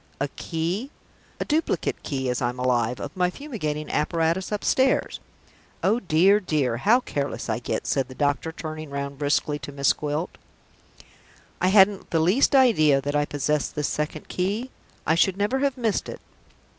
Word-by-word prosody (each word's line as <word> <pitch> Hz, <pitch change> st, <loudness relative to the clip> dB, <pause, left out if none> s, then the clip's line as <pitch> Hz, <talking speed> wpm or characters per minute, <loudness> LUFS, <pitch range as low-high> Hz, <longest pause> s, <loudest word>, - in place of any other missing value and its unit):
A 140 Hz, +1 st, -1 dB
key? 175 Hz, -, -3 dB, 0.5 s
A -, -, -2 dB
duplicate 315 Hz, +2 st, -1 dB
key, 135 Hz, -3 st, -3 dB
as 125 Hz, +1 st, -1 dB
I'm 120 Hz, 0 st, -1 dB
alive, 125 Hz, -1 st, 0 dB
of -, -, -6 dB
my 180 Hz, -1 st, +2 dB
fumigating 180 Hz, -, -4 dB
apparatus 165 Hz, +5 st, 0 dB
upstairs! 260 Hz, +5 st, +1 dB, 0.6 s
Oh 215 Hz, +5 st, +3 dB
dear, 190 Hz, +2 st, +4 dB
dear, 145 Hz, -, 0 dB
how 225 Hz, -, +4 dB
careless 140 Hz, -, -4 dB
I -, -, 0 dB
get," -, -, -3 dB
said 135 Hz, -2 st, 0 dB
the 130 Hz, -, -11 dB
doctor, 145 Hz, +3 st, 0 dB
turning 155 Hz, -2 st, -7 dB
round 140 Hz, 0 st, -5 dB
briskly 145 Hz, 0 st, 0 dB
to 145 Hz, 0 st, -8 dB
Miss 140 Hz, -1 st, +2 dB
Gwilt. 150 Hz, +3 st, -4 dB, 1.2 s
"I 185 Hz, -, +3 dB
hadn't 195 Hz, 0 st, +4 dB
the 165 Hz, -, +1 dB
least 195 Hz, -, +3 dB
idea 155 Hz, -, +5 dB
that 145 Hz, +2 st, -3 dB
I 145 Hz, 0 st, +2 dB
possessed 145 Hz, +1 st, -1 dB
this 150 Hz, -1 st, -1 dB
second 150 Hz, 0 st, -3 dB
key. 205 Hz, +8 st, -2 dB, 0.3 s
I -, -, +3 dB
should 185 Hz, +3 st, +2 dB
never 210 Hz, +7 st, 0 dB
have 275 Hz, -1 st, 0 dB
missed 225 Hz, -5 st, -1 dB
it. -, -, -7 dB
155 Hz, 165 wpm, -25 LUFS, 145-200 Hz, 1.2 s, idea